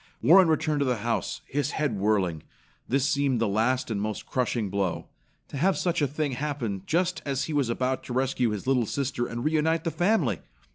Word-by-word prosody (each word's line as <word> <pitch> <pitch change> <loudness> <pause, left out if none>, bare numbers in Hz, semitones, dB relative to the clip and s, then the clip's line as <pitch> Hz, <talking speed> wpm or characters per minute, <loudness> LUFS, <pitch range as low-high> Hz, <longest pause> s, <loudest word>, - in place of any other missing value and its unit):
Warren 180 +3 +6
returned 155 -1 +1
to 140 - +2
the 125 -2 +1
house, 115 -1 -1
his 145 +1 -2
head 145 -7 0
whirling. 95 -6 +1 0.5
This 135 +2 +1
seemed 140 -4 +1
the 115 - +1
last 115 +5 0
and 100 -2 -1
most 105 0 -3
crushing 120 -5 -1
blow. 95 -3 -2 0.4
To - - -6
have 185 +7 +2
such 175 -2 0
a 145 - +3
thing 150 +1 -2
happen 125 -7 -3
just 180 +2 0
as 135 -2 -1
he 160 - -4
was 140 -5 +1
about 130 +2 -1
to 125 - -5
rescue 130 -1 +1
his 105 -2 -4
little 130 -4 +2
sister 130 -2 -2
and 120 +3 -5
reunite 160 +1 +1
the 165 - -1
family! 175 - +1
130 Hz, 200 wpm, -27 LUFS, 115-150 Hz, 0.5 s, Warren